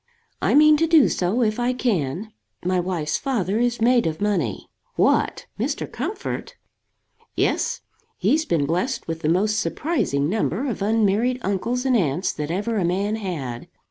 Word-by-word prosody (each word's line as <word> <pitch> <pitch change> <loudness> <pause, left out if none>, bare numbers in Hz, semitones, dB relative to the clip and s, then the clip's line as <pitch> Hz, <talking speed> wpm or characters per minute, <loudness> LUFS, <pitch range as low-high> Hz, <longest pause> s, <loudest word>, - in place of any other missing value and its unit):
"I - - +2
mean 305 +1 +7
to 330 +2 +2
do 320 -4 +6
so, 195 +8 0
if 215 +1 0
I 245 +1 +1
can. 210 - -2 0.3
My 185 0 +2
wife's 170 -4 -1
father 220 -7 -1
is 240 0 +1
made 240 -2 +3
of 155 -1 -3
money." 180 - -1 0.3
"What! - - +2
Mr. - - -1
Comfort?" - - -5 0.8
"Yes. - - 0 0.4
He's 285 - +2
been 165 - 0
blessed 180 - -1
with 165 -1 -3
the 150 - 0
most 210 +5 +2
surprising 170 - 0
number 215 - -1
of 230 -6 -3
unmarried 220 +3 +2
uncles 235 +6 -1
and 260 -2 +3
aunts 175 - +1
that 150 0 -4
ever 210 +6 -1
a - - +1
man 195 +5 0
had. 145 - -5
205 Hz, 160 wpm, -23 LUFS, 170-245 Hz, 0.8 s, mean